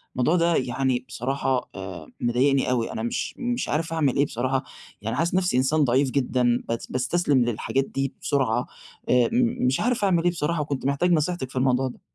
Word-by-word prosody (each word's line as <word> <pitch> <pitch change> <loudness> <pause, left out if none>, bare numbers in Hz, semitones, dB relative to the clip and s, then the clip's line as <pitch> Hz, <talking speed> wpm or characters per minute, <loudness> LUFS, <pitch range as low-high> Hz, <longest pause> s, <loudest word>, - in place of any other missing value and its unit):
الموضوع 130 +7 +2
ده 170 -1 +3
يعني 130 0 0
بصراحة 130 +1 -2
آآ، 95 -5 -7
مضايقني 130 +3 +2
أوي، 120 -3 0
أنا 110 - -4
مش 120 - -2
مش 245 -1 -2
عارف 165 +2 -1
أعمل 150 -5 +1
إيه 140 - +4
بصراحة 130 +1 -1 0.4
يعني 110 +2 -3
حاسس 170 +2 0
نَفْسي 185 -7 +2
إنسان 145 +4 +3
ضعيف 130 +1 +2
جدًا 125 -3 +1
بت 115 0 -3
باستستلم 130 0 +1
للحاجات 120 +3 -1
دي 135 0 -3
بسرعة 130 -6 0 0.4
آآ، 125 -1 +4
م 240 - +1
مش 130 +1 +2
عارف 240 -2 0
أعمل 175 -4 +3
إيه 175 - +3
بصراحة 165 -1 -1
وكنت 140 -3 -3
محتاج 140 +6 +1
نصيحتِك 165 -4 0
في - - -15
الموضوع 130 0 +2
ده. 125 - -9
135 Hz, 190 wpm, -25 LUFS, 125-165 Hz, 0.4 s, إيه